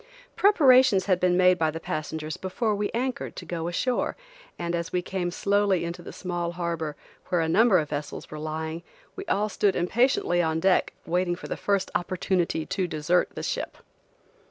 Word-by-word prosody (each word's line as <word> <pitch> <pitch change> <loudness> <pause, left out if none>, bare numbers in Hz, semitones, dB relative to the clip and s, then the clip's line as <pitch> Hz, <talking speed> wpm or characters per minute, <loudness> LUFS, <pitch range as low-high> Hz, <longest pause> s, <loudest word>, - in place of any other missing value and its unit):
Preparations 260 - +5
had 185 -3 +2
been 180 -1 +2
made 185 0 +5
by 160 -1 +2
the 160 +1 -5
passengers 155 0 -4
before 215 +4 -1
we 205 0 -1
anchored, 255 +2 -3
to - - -8
go 170 -1 -3
ashore, 245 +9 -1 0.4
and 170 0 -3
as 170 -1 -2
we 180 -1 0
came 180 -1 -2
slowly 200 -1 +1
into 170 +1 -5
the - - -9
small 175 -2 -3
harbor, 170 -3 -3 0.3
where 180 -2 +1
a 165 - +1
number 215 +3 +5
of 155 -3 -1
vessels 145 0 -5
were 155 - -6
lying, 160 +1 -4 0.3
we 390 - -7
all 210 - +1
stood 205 -2 +1
impatiently 180 -2 +2
on 160 -1 0
deck 190 +2 +2
waiting 175 0 0
for - - -9
the - - -3
first 200 -1 0
opportunity 175 -2 -1
to 185 -2 -1
desert 165 +3 +1
the - - -5
ship. - - -3
180 Hz, 180 wpm, -26 LUFS, 165-200 Hz, 0.4 s, Preparations